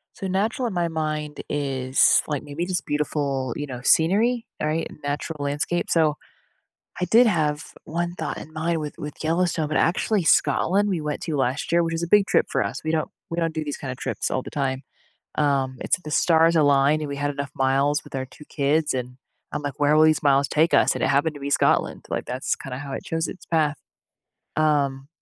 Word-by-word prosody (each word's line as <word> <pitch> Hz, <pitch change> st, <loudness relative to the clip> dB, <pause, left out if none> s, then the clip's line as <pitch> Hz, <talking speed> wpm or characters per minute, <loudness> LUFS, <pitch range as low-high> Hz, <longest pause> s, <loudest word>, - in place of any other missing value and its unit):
So, 195 Hz, -, -5 dB
natural 220 Hz, +6 st, 0 dB
in 210 Hz, -, -4 dB
my 175 Hz, -1 st, 0 dB
mind 155 Hz, -2 st, -3 dB
is, 135 Hz, -2 st, +2 dB
like, 150 Hz, -1 st, -2 dB
maybe 150 Hz, +4 st, -4 dB
just 185 Hz, -1 st, -2 dB
beautiful, 145 Hz, -4 st, -1 dB
you 145 Hz, -, -3 dB
know, 125 Hz, -3 st, -7 dB
scenery, 220 Hz, -, +3 dB, 0.2 s
alright, 155 Hz, +2 st, 0 dB
and -, -, -14 dB
natural 145 Hz, +2 st, -3 dB
landscape. 145 Hz, +4 st, -1 dB
So, 155 Hz, -3 st, +2 dB, 0.8 s
I 180 Hz, -, +1 dB
did 230 Hz, +7 st, +6 dB
have 155 Hz, -7 st, +1 dB, 0.2 s
1 170 Hz, +2 st, -3 dB
thought -, -, -4 dB
in 155 Hz, -, -9 dB
mind 160 Hz, +1 st, -1 dB
with 150 Hz, -1 st, -6 dB
with 150 Hz, +1 st, -7 dB
Yellowstone, 165 Hz, -1 st, +1 dB
but, 155 Hz, -, 0 dB
actually, 185 Hz, +3 st, +1 dB
Scotland, 195 Hz, +5 st, +3 dB
we 180 Hz, -4 st, 0 dB
went 150 Hz, -1 st, -3 dB
to 155 Hz, -3 st, -2 dB
last 130 Hz, +3 st, -1 dB
year 170 Hz, 0 st, +4 dB
which 165 Hz, -, -2 dB
is 165 Hz, +1 st, -2 dB
a -, -, -1 dB
big 205 Hz, +2 st, +5 dB
trip -, -, +2 dB
for -, -, +1 dB
us, 115 Hz, +9 st, -5 dB
we 155 Hz, -, -1 dB
don't 160 Hz, -1 st, -1 dB, 0.2 s
we 165 Hz, -, -4 dB
don't 165 Hz, -1 st, 0 dB
do 155 Hz, -, -1 dB
these 145 Hz, -2 st, -4 dB
kind 135 Hz, -, -5 dB
of 125 Hz, -, -7 dB
trips -, -, -3 dB
all 130 Hz, -, -1 dB
the -, -, -9 dB
time, 135 Hz, -2 st, -2 dB, 0.5 s
um, 135 Hz, -3 st, +1 dB
it's -, -, +1 dB
if 180 Hz, -, -25 dB
the 155 Hz, -, -6 dB
stars 165 Hz, +1 st, +4 dB
align, 145 Hz, 0 st, +4 dB
and 150 Hz, -, -4 dB
we 140 Hz, -, -4 dB
had 145 Hz, +1 st, -1 dB
enough 140 Hz, -1 st, -4 dB
miles 135 Hz, +3 st, +1 dB
with -, -, -15 dB
our 130 Hz, -1 st, -2 dB
2 130 Hz, +4 st, -15 dB
kids, 150 Hz, +1 st, 0 dB
and 125 Hz, 0 st, -4 dB, 0.4 s
I'm 150 Hz, -, -3 dB
like, 145 Hz, -2 st, -5 dB
"Where 145 Hz, +1 st, +3 dB
will 155 Hz, -, +6 dB
these 155 Hz, -1 st, +3 dB
miles 140 Hz, -1 st, +3 dB
take 160 Hz, +3 st, +2 dB
us?" -, -, +4 dB
And -, -, -4 dB
it -, -, +2 dB
happened 150 Hz, +3 st, +2 dB
to 145 Hz, -, -10 dB
be 140 Hz, +1 st, -4 dB
Scotland, -, -, +1 dB
like, -, -, -3 dB
that's 130 Hz, +2 st, -2 dB
kinda 130 Hz, -1 st, -7 dB
how 140 Hz, -1 st, -7 dB
it -, -, -5 dB
chose 165 Hz, 0 st, -1 dB
its 185 Hz, -, -9 dB
path, 155 Hz, -3 st, +1 dB, 0.8 s
um 140 Hz, -3 st, +1 dB
150 Hz, 225 wpm, -24 LUFS, 140-165 Hz, 0.8 s, did